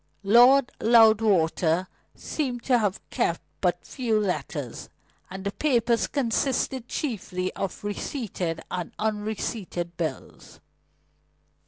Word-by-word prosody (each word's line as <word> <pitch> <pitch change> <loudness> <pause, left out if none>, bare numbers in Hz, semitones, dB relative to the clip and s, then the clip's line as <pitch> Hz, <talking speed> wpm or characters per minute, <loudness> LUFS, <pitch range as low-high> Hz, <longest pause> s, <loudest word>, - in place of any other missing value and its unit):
Lord 245 +6 +6
Loudwater 205 -7 +4 0.3
seemed 250 -6 -3
to 250 -2 +3
have 205 -3 -2
kept - - 0 0.2
but - - 0
few 230 -5 0
letters, 155 - -3 0.4
and 190 +1 -7
the 200 - -2
papers 240 -3 +1
consisted 260 -1 -1
chiefly 185 - -3
of 195 - -5
receipted 200 - -3
and 180 -2 -4
unreceipted 210 -4 -3
bills. 155 -6 -6
215 Hz, 100 wpm, -26 LUFS, 180-240 Hz, 0.4 s, Lord